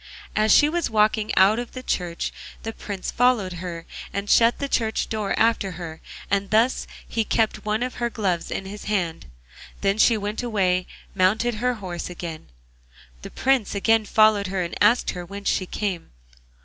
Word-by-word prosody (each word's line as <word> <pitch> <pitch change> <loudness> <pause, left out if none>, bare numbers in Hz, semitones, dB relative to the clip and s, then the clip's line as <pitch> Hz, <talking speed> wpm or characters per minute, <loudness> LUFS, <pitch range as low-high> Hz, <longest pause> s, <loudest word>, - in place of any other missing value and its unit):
As 215 0 +3
she 295 - +7
was 340 +2 -1
walking 215 0 +2
out 200 +4 +5
of 240 +1 -7
church 175 -2 -2 0.3
the 225 - -4
Prince 200 -4 -5
followed 240 -7 +2
her 170 -2 -6 0.3
and 200 +1 -3
shut 230 +1 +5
the 280 - -3
church 225 -4 0
door 210 -3 -1
after 225 -4 +2
her, 165 -2 -8 0.3
and 200 -1 +1
thus 225 +4 +2 0.2
he 225 - 0
kept 220 0 0
one 215 +2 0
of 255 - -3
her 240 - +1
gloves 190 -7 -1
in 195 - -4
his 205 +2 -8
hand. 175 - -2 0.5
Then 200 +2 +1
she 230 0 +5
went 210 +2 -3
away 200 -7 +1
and 185 - -5 0.3
mounted 210 +6 +2
her 250 0 +1
horse 180 -6 -6
again; 170 -3 -7 0.7
the - - -8
Prince 265 -6 +1
again 225 +2 +3
followed 215 -1 +4
her, 185 -1 -1
and 170 - -5
asked 215 +4 +4
her 180 - -6
whence 200 +3 -4
she 185 - 0
came. 190 -5 -3
210 Hz, 175 wpm, -24 LUFS, 185-225 Hz, 0.7 s, she